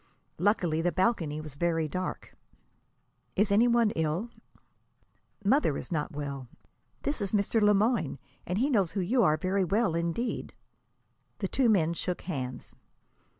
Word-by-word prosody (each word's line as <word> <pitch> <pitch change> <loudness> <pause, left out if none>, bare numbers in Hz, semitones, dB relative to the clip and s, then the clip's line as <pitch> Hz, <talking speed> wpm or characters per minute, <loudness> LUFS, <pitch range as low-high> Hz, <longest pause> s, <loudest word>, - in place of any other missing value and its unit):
Luckily, 175 -4 +2
the 175 +1 +1
balcony 180 -7 0
was 155 -2 -8
very 165 +1 0
dark. 185 +5 -5 1.0
"Is 205 +1 +2
any 220 +4 +5
one 235 -2 +3
ill?" 165 +8 -1 1.1
"Mother 205 - +3
is - - -7
not 150 -3 -1
well. 140 -3 -5 0.6
This 285 -5 0
is 195 0 -2
Mr. 210 +2 +2
Le 210 0 +5
Moyne, 210 - +1 0.3
and 180 - -1
he 270 +6 +1
knows 195 -9 +2
who 200 - -1
you 235 +8 +2
are 155 -7 +4
very 190 +4 0
well, 200 +1 +1
indeed." 170 +8 -2 0.8
The - - -2
two 260 -4 +2
men 170 -6 +3
shook 180 +1 -3
hands. 130 -8 -5
185 Hz, 150 wpm, -29 LUFS, 160-215 Hz, 1.1 s, any